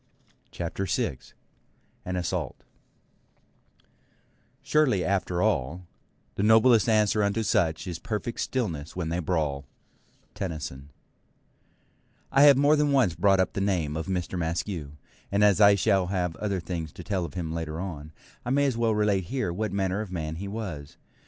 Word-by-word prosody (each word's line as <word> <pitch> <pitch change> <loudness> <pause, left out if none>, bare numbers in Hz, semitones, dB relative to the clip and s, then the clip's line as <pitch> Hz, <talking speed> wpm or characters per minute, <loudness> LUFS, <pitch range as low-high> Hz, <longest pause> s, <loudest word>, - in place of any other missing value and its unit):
CHAPTER 90 +3 -4
6 65 -6 -3 0.7
AN 90 - -3
ASSAULT 90 -1 -3 2.0
Surely 135 -12 +2
after 90 -2 0
all, 90 -4 0 0.5
The - - -3
noblest 110 +2 +5
answer 105 -1 +3
unto 100 +2 +1
such 80 -5 +1
Is 85 -3 -5
perfect 115 0 -4
stillness 85 - -3
when 85 -3 -3
they 85 +2 -1
brawl 75 -5 -1 0.7
Tennyson 75 -6 -5 1.4
I 135 - +4
have 140 -2 +8
more 145 +2 +5
than 150 -1 +2
once 130 -11 +3
brought 95 +4 +3
up 95 - +1
the 100 - -2
name 85 -7 0
of 80 +3 -4
Mr. 90 -1 -2
Maskew; 80 -2 -3 0.4
and 100 +1 +2
as 105 0 +4
I 100 0 +8
shall 95 -2 +2
have 90 -3 -1
other 100 -3 -2
things 85 -2 -5
to 90 - -9
tell 95 -2 -1
of 75 -4 -7
him 80 -3 -3
later 80 -1 -4
on, 80 -5 -6 0.3
I - - -4
may 140 +2 +3
as 135 -4 +1
well 115 -2 +1
relate 105 -3 +1
here 120 -4 -2
what 105 +4 -2
manner 95 0 -1
of 105 -4 -7
man 80 -3 -4
he 100 +3 -5
was. 95 -9 -6
95 Hz, 160 wpm, -27 LUFS, 80-105 Hz, 2.0 s, have